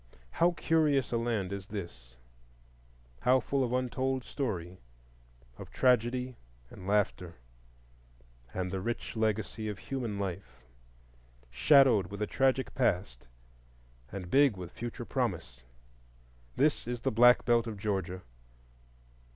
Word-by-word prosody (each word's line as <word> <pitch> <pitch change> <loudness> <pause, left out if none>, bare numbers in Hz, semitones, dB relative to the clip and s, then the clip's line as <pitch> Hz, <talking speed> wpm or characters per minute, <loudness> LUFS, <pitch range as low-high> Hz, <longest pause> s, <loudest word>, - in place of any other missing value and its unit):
How 175 +1 +2
curious 150 -5 +2
a 120 - +1
land 110 -5 -1
is 100 -1 -6
this,—how - - -5
full 135 +2 -1
of 120 - -2
untold 130 +1 -1
story, 95 - -4 0.8
of - - -9
tragedy 125 0 +1 0.3
and 95 -2 -10
laughter, 95 -4 0 1.2
and 90 -1 -3
the 95 -1 -3
rich 120 +4 -4
legacy 110 0 -1
of 105 - -5
human 120 -6 -4
life; 90 -11 -6 0.9
shadowed 120 - +5
with 100 +2 -8
a 105 - 0
tragic 135 +2 +1
past, 90 - -1 0.8
and 90 -3 -7
big 135 -6 +4
with 90 -2 -7
future 120 0 -6
promise! - - -3 0.9
This 145 -3 +1
is 120 -1 -3
the - - 0
Black 120 +2 +6
Belt 120 -1 +3
of 110 -2 -5
Georgia. 95 -3 -3
105 Hz, 120 wpm, -30 LUFS, 90-125 Hz, 1.2 s, Black